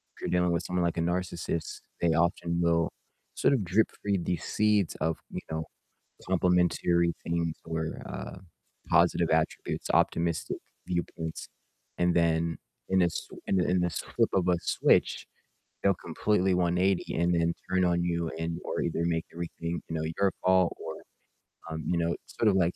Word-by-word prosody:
if - - -17
you're - - -2
dealing 90 0 +2
with 85 0 0
someone 90 0 -1
like 85 0 -1
a - - +1
narcissist, 85 -2 -2 0.2
they 85 - +3
often 85 +1 +1
will 85 -1 +2 0.5
sort - - +3
of 125 -7 +1
drip-feed 100 0 0
these 90 -3 -1
seeds 105 -4 +2
of, 80 0 0
you - - -4
know, 80 0 -1 0.6
complimentary 90 -1 +3
things 85 -1 -1
or, 80 -1 -3
uh, - - -6 0.5
positive - - +4
attributes, - - 0
optimistic 85 -1 +1 0.3
viewpoints, 85 -2 -3 0.5
and 90 0 +2
then 85 -1 +2 0.3
in 95 0 +4
a - - +5
s 85 - -3 0.2
in 95 - +2
a - - +2
in 90 - +2
the 90 - +1
flip 85 - 0
of 90 -2 +2
a 90 - +3
switch, - - +2 0.6
they'll 100 0 +4
completely 95 +3 +1
180 90 +1 +1
and 85 +1 +2
then 85 0 +2 0.2
turn 95 0 +3
on 85 -1 +2
you, 85 -1 0
and 85 0 -2
or - - -2
either 85 0 -1
make 80 -1 0
everything, 85 0 -4
you 80 - -3
know, 80 - -2 0.2
your 100 -1 +3
fault, 95 -1 +4
or, - - -5 0.8
um, 80 0 -4
you 90 - +1
know, 85 0 +1
sort 110 - +1
of 100 - +2
like, 90 -2 +2
85 Hz, 170 wpm, -29 LUFS, 85-90 Hz, 0.8 s, a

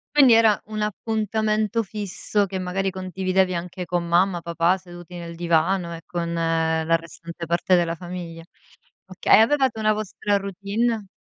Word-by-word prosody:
Quindi 265 -5 +7
era 225 -2 +5
un 215 0 -5
appuntamento 215 +1 -1
fisso 205 0 -2
che 190 - -4
magari 190 +1 -1
condividevi 185 0 0
anche 175 +1 -5
con 175 0 -1
mamma, 175 +1 +2
papà 170 +2 +1
seduti 175 -1 -12
nel 170 -1 -7
divano 170 +1 +1
e 165 - -10
con 170 -1 -3
la 165 0 +1
restante 170 +1 -7
parte 170 +2 +2
della 170 -1 +1
famiglia. 175 -1 -8 0.6
Oka 185 -1 +2
e - - +9
avevate 260 0 +3
una 215 0 +3
vostra 210 -1 -1
routine? 200 +3 -2
185 Hz, 150 wpm, -23 LUFS, 170-210 Hz, 0.6 s, e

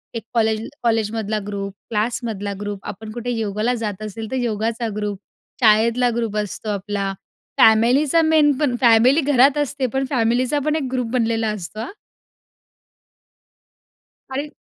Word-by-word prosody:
एक 230 - -4
कॉलेज 220 -1 +1 0.2
कॉलेजमधला 220 -2 0
group, 200 -1 -4 0.2
क्लासमधला 215 -2 -2
group, 205 -1 -4
आपण 215 +2 -7
कुठे 240 +1 -4
योगाला 220 +1 -1
जात 210 -1 -4
असेल 215 +1 -6
तर - - -1
योगाचा 230 0 -1
ग्रुप, 210 -2 -3 0.5
शाळेतला 230 +3 +4
ग्रुप 225 -3 -2
असतो 210 +1 -4
आपला, 200 -1 -2 0.5
फॅमिलीचा 255 +9 +5
मेन, 315 -2 +4
पण 280 -5 +1
फॅमिली 245 +6 +5
घरात 275 0 +4
असते 285 -2 -1
पण 270 0 +1
फॅमिलीचा 250 +2 +1
पण 305 0 +1
एक 310 - -1
ग्रुप 250 -3 -1
बनलेला 225 -2 0
असतो 210 +1 -7
हां. 230 - -5 2.4
आणि 280 +3 -3
225 Hz, 135 wpm, -21 LUFS, 210-255 Hz, 2.4 s, फॅमिलीचा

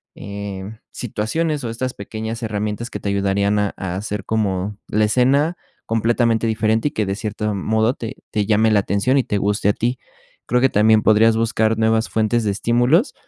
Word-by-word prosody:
eh, 100 -1 -6 0.3
situaciones 140 +7 -2
o 115 - -3
estas 125 +3 -3
pequeñas 110 +3 -6
herramientas 105 +2 -3
que - - -6
te 100 - -3
ayudarían 100 +1 +1
a 105 -1 0
a 95 -2 -4
hacer 105 0 -4
como 100 -2 -1
la 105 0 +2
escena 135 +9 +2 0.3
completamente 115 0 +1
diferente, 110 +3 +1
y - - -19
que 110 -5 -1
de 95 - -2
cierto 105 0 -3
modo 110 +4 +1
te 115 -4 -7 0.2
te 105 -1 0
llame 110 +1 +3
la 105 - +4
atención 100 +8 +1
y 135 - +3
te 105 - -1
guste 100 +1 +1
a - - +3
ti. 120 +2 -2 0.5
Creo 125 +1 +2
que 135 - +4
también 110 +1 +4
podrías 110 +1 +5
buscar 115 -1 +1
nuevas 110 0 +1
fuentes 110 +1 +1
de 105 - +1
estímulos, 120 - +2
110 Hz, 185 wpm, -20 LUFS, 105-115 Hz, 0.5 s, podrías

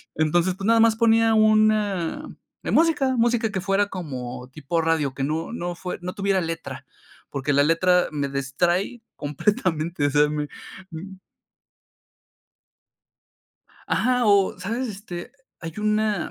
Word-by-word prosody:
Entonces, 170 +4 +1
pues, 195 +1 -6
nada 230 +1 +4
más 225 -1 +5
ponía 225 0 +4
una 215 - +2 0.4
de - - -3
música, 295 -6 +3
música 235 -1 +2
que 190 -2 -3
fuera 200 +1 +1
como 130 -8 -6
tipo 155 +4 -2
radio, 160 -4 0
que 135 0 -4
no 160 +8 -2
no 175 -6 -4
fue 180 +2 -6
no 180 +1 -5
tuviera 195 -1 0
letra, 165 -1 -5 0.4
porque 140 +1 -2
la 140 +1 +4
letra 180 +3 +3
me 145 -2 -2
distrae 175 - -1
completamente, 165 - -1
o - - +1
sea, 150 +1 +3
me 150 -1 -2 0.4
mm. 190 +4 -8 2.7
Ajá, 250 0 +2
o 200 -3 +3
sabes, 230 +7 -3
este, 190 -3 -8 0.3
hay 165 -2 -6
una 210 -2 0
180 Hz, 135 wpm, -24 LUFS, 155-215 Hz, 2.7 s, más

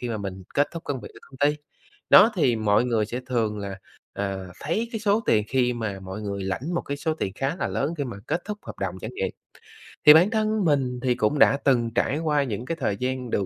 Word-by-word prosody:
khi 125 - -4
mà 115 - -2
mình 95 -2 -6
kết 145 - +3
thúc 165 -1 -7
công 135 -3 -3
việc - - -9
ở - - -12
công 135 - -16
ty. 150 - -5 0.5
Đó, 230 - +8
thì 135 - +2
mọi 110 +1 +2
người 115 -4 +1
sẽ 120 +4 -4
thường 115 -4 -1
là, 100 -1 -6 0.3
à, 95 -1 -3 0.2
thấy 210 +10 -1
cái 225 - -3
số 210 0 +2
tiền 105 -1 +3
khi 125 -2 +2
mà 110 -5 -4
mọi 95 +2 -7
người 100 -1 -4
lãnh 125 - -3
một 170 - +1
cái 140 - -4
số 155 +2 -1
tiền 100 -11 -3
khá 135 - -2
là - - -2
lớn 145 +5 -1
khi 145 - -1
mà 120 -6 -6
kết 175 - -1
thúc 210 0 -5
hợp - - -9
đồng - - -3
chẳng - - -5
nhiệm. 470 +5 -1 0.8
Thì 150 - +11
bản 170 +6 +6
thân 215 -2 0
mình 135 -5 +1
thì 125 -1 +2
cũng 120 +5 0
đã 140 - +6
từng 120 -4 +3
trải 140 +5 +1
qua 150 -3 +1
những 115 -2 -4
cái 165 +4 -3
thời 105 -7 -1
gian 125 +1 -3
được 100 - 0
125 Hz, 255 wpm, -25 LUFS, 105-155 Hz, 0.8 s, Thì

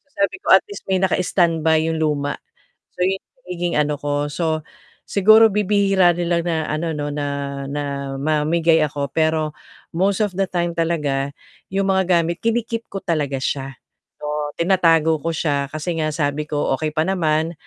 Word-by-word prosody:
so, 280 - -38
sabi 200 - +1
ko - - +4
at - - +9
least 410 - -9
may 190 -1 0
naka-stand 175 -3 +1
by 160 -1 +4
yung 160 0 -1
luma. 145 -2 -1 0.6
So, 180 - -1
yung 190 +1 +1 0.2
nagiging 175 -1 -3
ano 150 -1 0
ko, 145 0 -2
so, 160 0 -1 0.4
siguro 215 +3 +6
bibihira 195 -3 +3
nila 170 0 0
na 170 -1 -1 0.2
ano 160 +1 -2
'no, 145 0 -3
na 145 0 -3 0.4
na 140 -1 -4
mamigay 155 +3 +2
ako, 145 -2 -1
pero 155 -1 +1 0.4
most 195 +3 +1
of 205 -4 0
the 195 - +1
time 175 -1 -1
talaga, 150 -5 -1 0.4
'yong 195 0 0
mga 190 -1 +3 0.2
gamit 170 +1 -3
kini-keep 230 0 -1
ko 195 - -4
talaga 150 -7 -1
siya, 135 0 -3 0.4
o, 150 0 -3
tinatago 165 -3 +3
ko 165 - 0
siya 145 -3 -1
kasi 155 +3 -3
nga 155 0 0
sabi 145 -1 -1
ko 145 -2 0
okey 155 +3 -2
pa 155 +1 0
naman, 165 -3 0
160 Hz, 170 wpm, -21 LUFS, 150-180 Hz, 0.6 s, at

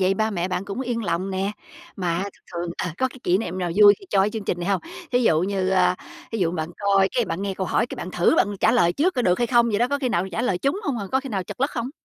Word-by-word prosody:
vậy 190 +1 +3
ba 220 +2 0
mẹ 180 -2 -2
bạn 185 +1 -2
cũng 200 +5 -5
yên 240 -3 -2
lòng 175 +3 -1
nè. 195 +2 -1 0.4
Mà 180 -2 -1
thường 200 - -4 0.2
thường 170 0 -3
ờ, 180 - -2
có 260 - +2
cái 260 - -14
kỷ 180 +1 +2
niệm 185 -4 -4
nào 180 -2 -1
vui 205 0 +9
khi 390 - -15
choi 195 - +4
cái 210 - 0
chương 220 -2 -5
trình 175 - -2
này 175 - -3
hông? 195 -2 +1 0.3
Thí 245 - +3
dụ 160 -8 +4
như, 190 0 0
a, 180 -1 +3 0.4
thí 225 - -2
dụ 175 -4 +1
bạn 160 -1 -3
coi 195 -1 +3
cái, 240 - +2
bạn 190 0 -4
nghe 195 -1 -2
câu 190 -1 -3
hỏi 235 - +1
cái - - -8
bạn 185 - -6
thử 175 - +3
bạn 205 -1 +2
trả 225 - +4
lời 175 -8 +3
trước 355 - +1
có 250 - 0
được 180 -3 +2
hay 240 - +2
không 235 0 +4
vậy 205 - 0
đó, 240 +2 +2
có 285 +1 0
khi 260 - -1
nào 180 -5 0
trả 225 - -1
lời 190 -7 0
trúng 280 - 0
hông 265 -9 -1
à, 200 - -4
có 265 - +3
khi 270 - -8
nào 195 -6 -2
trật 250 - -9
lất 275 - +2
không? 240 +1 -3
200 Hz, 325 wpm, -23 LUFS, 180-240 Hz, 0.4 s, vui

